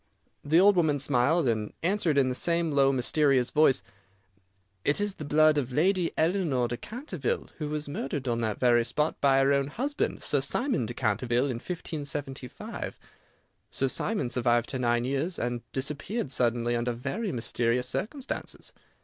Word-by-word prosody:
The 155 Hz, +4 st, +4 dB
old 200 Hz, +2 st, +6 dB
woman 160 Hz, -5 st, +2 dB
smiled, 140 Hz, +3 st, +2 dB
and 110 Hz, -3 st, -1 dB
answered 175 Hz, -4 st, +1 dB
in 135 Hz, -2 st, +4 dB
the 130 Hz, -, 0 dB
same 170 Hz, +3 st, +1 dB
low, 135 Hz, -1 st, +4 dB
mysterious 135 Hz, 0 st, +2 dB
voice, 150 Hz, -9 st, +4 dB, 1.0 s
"It 145 Hz, -, +2 dB
is 205 Hz, -1 st, 0 dB
the 155 Hz, -, -8 dB
blood 155 Hz, +1 st, +4 dB
of 130 Hz, -2 st, -4 dB
Lady 175 Hz, +5 st, +2 dB
Eleanore 160 Hz, -8 st, +1 dB
de 120 Hz, -, -3 dB
Canterville, 255 Hz, -, -4 dB
who 150 Hz, -2 st, -3 dB
was 150 Hz, 0 st, -3 dB
murdered 140 Hz, -1 st, -4 dB
on 115 Hz, -1 st, 0 dB
that 110 Hz, -2 st, -2 dB
very 120 Hz, -2 st, +4 dB
spot 150 Hz, +7 st, -1 dB
by 135 Hz, -1 st, +4 dB
her 140 Hz, +1 st, +3 dB
own 140 Hz, 0 st, +1 dB
husband, 275 Hz, -, -2 dB
Sir 145 Hz, -, +1 dB
Simon 220 Hz, -, 0 dB
de 120 Hz, -, -6 dB
Canterville, 120 Hz, +3 st, 0 dB
in 120 Hz, -, -3 dB
1575. 145 Hz, -5 st, -5 dB, 0.7 s
Sir 135 Hz, -, 0 dB
Simon 205 Hz, -, -1 dB
survived 120 Hz, -1 st, +1 dB
her 130 Hz, -, -3 dB
nine 120 Hz, -1 st, +1 dB
years, 140 Hz, +7 st, -1 dB
and 120 Hz, -1 st, -2 dB
disappeared 145 Hz, -, -3 dB
suddenly 120 Hz, -2 st, +1 dB
under 120 Hz, +1 st, -1 dB
very 140 Hz, -, -3 dB
mysterious 120 Hz, 0 st, 0 dB
circumstances. 250 Hz, -, -4 dB
140 Hz, 160 wpm, -28 LUFS, 120-160 Hz, 1.0 s, old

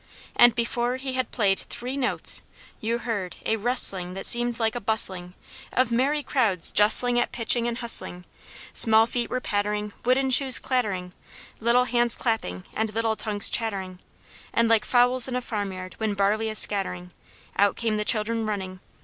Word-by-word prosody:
And 240 Hz, -1 st, +5 dB
before 240 Hz, +1 st, -2 dB
he 260 Hz, 0 st, -6 dB
had 255 Hz, -2 st, -3 dB
played 195 Hz, -4 st, -1 dB
three 250 Hz, +3 st, -7 dB
notes, 265 Hz, -2 st, +6 dB, 0.4 s
you 230 Hz, +2 st, -3 dB
heard 210 Hz, -7 st, -5 dB
a 220 Hz, -, 0 dB
rustling, 200 Hz, -6 st, +2 dB
that 195 Hz, -, -6 dB
seemed 240 Hz, 0 st, +1 dB
like 225 Hz, -1 st, -1 dB
a 245 Hz, -, -6 dB
bustling 190 Hz, -4 st, +2 dB, 0.4 s
Of 255 Hz, -2 st, 0 dB
merry 280 Hz, +5 st, -1 dB
crowds 215 Hz, -, 0 dB
justling 240 Hz, +4 st, +5 dB
at 240 Hz, -, -2 dB
pitching 235 Hz, 0 st, 0 dB
and 235 Hz, -1 st, -4 dB
hustling; 205 Hz, -7 st, +1 dB, 0.5 s
Small 220 Hz, -1 st, +4 dB
feet 235 Hz, 0 st, -4 dB
were 255 Hz, -, -3 dB
pattering, 210 Hz, -2 st, -4 dB
wooden 260 Hz, +2 st, 0 dB
shoes 260 Hz, 0 st, +3 dB
clattering, 200 Hz, -8 st, -3 dB, 0.5 s
Little 235 Hz, +2 st, +2 dB
hands 240 Hz, -1 st, +1 dB
clapping 95 Hz, -, -4 dB
and 220 Hz, 0 st, -3 dB
little 225 Hz, -1 st, -1 dB
tongues 210 Hz, -2 st, +1 dB
chattering, 195 Hz, -5 st, -4 dB, 0.5 s
And 230 Hz, 0 st, +1 dB
like 225 Hz, -1 st, +1 dB
fowls 245 Hz, 0 st, +3 dB
in 255 Hz, -, -5 dB
a -, -, -1 dB
farmyard 195 Hz, -5 st, -6 dB
when 215 Hz, -2 st, -3 dB
barley 210 Hz, +3 st, -1 dB
is 215 Hz, -, +1 dB
scattering, 180 Hz, -4 st, +1 dB, 0.4 s
Out 200 Hz, -1 st, +1 dB
came 225 Hz, -2 st, -3 dB
the 210 Hz, -, -2 dB
children 225 Hz, +1 st, -1 dB
running. 190 Hz, -3 st, -6 dB
225 Hz, 165 wpm, -24 LUFS, 205-245 Hz, 0.5 s, notes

